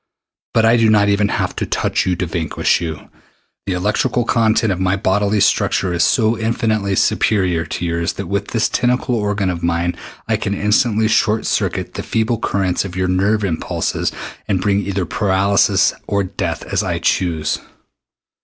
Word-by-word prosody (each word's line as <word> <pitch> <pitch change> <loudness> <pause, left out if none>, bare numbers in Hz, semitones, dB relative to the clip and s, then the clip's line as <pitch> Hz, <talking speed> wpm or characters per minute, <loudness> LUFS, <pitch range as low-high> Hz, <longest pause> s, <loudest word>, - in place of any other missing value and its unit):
But 115 -1 +4
I 115 +1 +5
do 115 -1 +4
not 105 -1 +4
even 100 0 +2
have - - -2
to - - -2
touch - - 0
you 90 - +1
to 90 - -2
vanquish 80 -1 0
you. 80 -3 -6 0.6
The 95 - 0
electric 105 +8 0
content 110 -3 +2
of 90 - -6
my 95 0 +1
bodily 100 +2 +1
structure 95 -2 +1
is 85 0 +2
so 110 +3 +2
infinitely 110 -3 0
superior 90 -6 +1
to 85 - -4
yours 85 0 -1
that - - -6
with - - -2
this - - 0
tentacle 125 +1 0
organ 105 -4 0
of 85 -1 -5
mine 85 0 0 0.3
I - - +1
can 100 - -2
instantly 110 +2 +2
short 110 0 +1
circuit - - -1
the - - -4
feeble 115 0 -1
currents 95 -5 0
of 95 -2 -7
your 95 0 0
nerve 100 +4 +1
impulses 85 -5 -2 0.4
and 95 -3 +1
bring 100 +1 +1
either 100 -2 -2
paralysis 100 +2 +2
or 100 -1 0
death 90 -3 -4
as - - -1
I - - -2
choose. 80 -5 0
100 Hz, 175 wpm, -18 LUFS, 90-110 Hz, 0.6 s, I